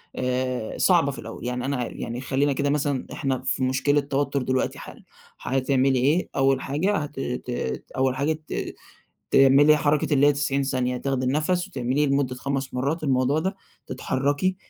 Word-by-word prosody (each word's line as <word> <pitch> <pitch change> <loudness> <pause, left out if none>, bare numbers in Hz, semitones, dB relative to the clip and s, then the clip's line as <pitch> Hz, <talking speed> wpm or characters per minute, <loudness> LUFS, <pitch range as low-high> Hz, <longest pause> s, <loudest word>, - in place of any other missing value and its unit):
آآ، 125 -2 -2
صعبة - - +3
في - - -9
الأوّل، - - -8
يعني 125 0 -2
أنا 140 0 -1
عار 125 -1 -4
يعني 120 +2 -5
خلّينا 135 +2 +1
كده 140 +1 0
مثلًا 145 -2 -1
إحنا 135 -2 -2
في - - 0
مشكلة 130 +3 +2
توتّر 140 0 -1
دلوقتي 130 +1 -1
حالًا - - -11 0.3
حتعملي 135 0 +1
إيه، 150 +8 +2
أوّل 135 -1 +2
حاجة 165 +9 0
هت 145 -2 -5
ت 125 -1 -4 0.5
أوّل 130 0 +2
حاجة 145 +4 +1
ت - - -4 0.6
تعملي 140 +3 +6
حركة 150 0 +1
اللي 145 +1 +5
هي 145 - +6
90 140 -1 0
ثانية 125 -2 -1
تاخدي 135 0 -1
النفس، 155 +7 0
وتعمليه 135 -2 0
لمدة 135 -2 0
5 135 +1 -3
مرّات 140 +6 -1
الموضوع 135 +1 +2
ده، 190 +4 -2 0.3
تتحركي 140 +7 -1
135 Hz, 165 wpm, -24 LUFS, 130-145 Hz, 0.6 s, تعملي